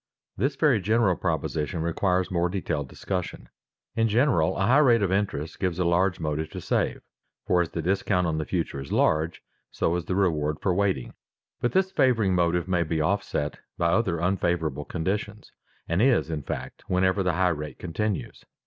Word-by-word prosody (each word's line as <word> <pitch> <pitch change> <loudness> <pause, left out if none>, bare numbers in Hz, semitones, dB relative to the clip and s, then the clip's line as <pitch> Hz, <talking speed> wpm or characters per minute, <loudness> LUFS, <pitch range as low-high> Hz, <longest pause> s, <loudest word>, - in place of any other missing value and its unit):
_ - - -67 0.3
This 135 +2 0
very 130 -7 +3
general 110 -2 +2
proposition 80 0 -2
requires 90 +2 0
more 90 0 +1
detailed 80 -7 -3
discussion. 90 -2 -5 0.5
In 115 0 +2
general, 105 - +2
a 95 - +1
high 130 +8 +5
rate 120 -7 +5
of 95 - +1
interest 95 -5 -2
gives 90 -3 -1
a 90 - 0
large 90 +2 +2
motive 80 -1 -2
to - - -5
save, - - -1 0.4
for 90 -1 +3
as 85 - -2
the 80 - -4
discount 95 0 +1
on 80 -2 -1
the 80 - -2
future 85 -6 -2
is 70 - -9
large, 80 +1 +1 0.3
so 85 - 0
is 90 -1 -3
the 90 - -2
reward 75 -6 +1
for 95 - +1
waiting. 95 -8 0 0.5
But 120 - -1
this 190 0 +2
favoring 120 - +3
motive 85 0 +1
may 90 -2 +1
be 80 -1 -1
offset 75 -3 -1 0.2
by 85 - +2
other 90 -7 +1
unfavorable 85 -5 0
conditions, 100 +4 -3 0.4
and 85 +4 +1
is, 120 -9 +3
in 75 -2 -2
fact, 65 -1 -6
wherever 95 +2 +2
the 90 -2 +1
high 90 +2 +2
rate 75 -2 -4
continues. 100 +3 -3
90 Hz, 185 wpm, -26 LUFS, 80-100 Hz, 0.5 s, high